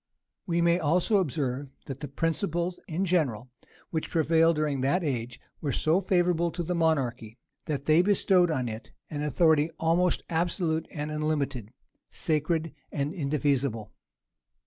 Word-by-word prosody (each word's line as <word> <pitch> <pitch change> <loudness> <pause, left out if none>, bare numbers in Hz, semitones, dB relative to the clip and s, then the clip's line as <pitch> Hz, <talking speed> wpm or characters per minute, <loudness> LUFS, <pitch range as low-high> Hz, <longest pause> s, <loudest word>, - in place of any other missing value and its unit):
We 170 -1 +1
may 170 +1 +3
also 175 +6 +2
observe, 140 -6 -1 0.2
that 135 -1 -6
the 150 - -5
principles 170 +4 -1
in 180 +2 -1
general 130 - 0 0.4
which 160 -2 -2
prevailed 165 0 +3
during 150 -3 -1
that 155 +8 +1
age, 125 -4 -3 0.2
were 145 - -1
so 160 +7 +2
favorable 175 -2 +2
to 175 0 -2
monarchy, 130 -9 0 0.3
that 145 -2 -3
they 155 +2 +5
bestowed 185 -2 +3
on 130 -6 -1
it 110 0 -7 0.2
an 145 -1 -3
authority 150 +1 +3
almost 170 +2 +2
absolute 165 -1 -1
and 150 -1 -4
unlimited, 145 -7 -2 0.4
sacred 160 0 -1 0.2
and 145 +2 -2
indefeasible. 140 - -1
155 Hz, 135 wpm, -28 LUFS, 140-170 Hz, 0.4 s, they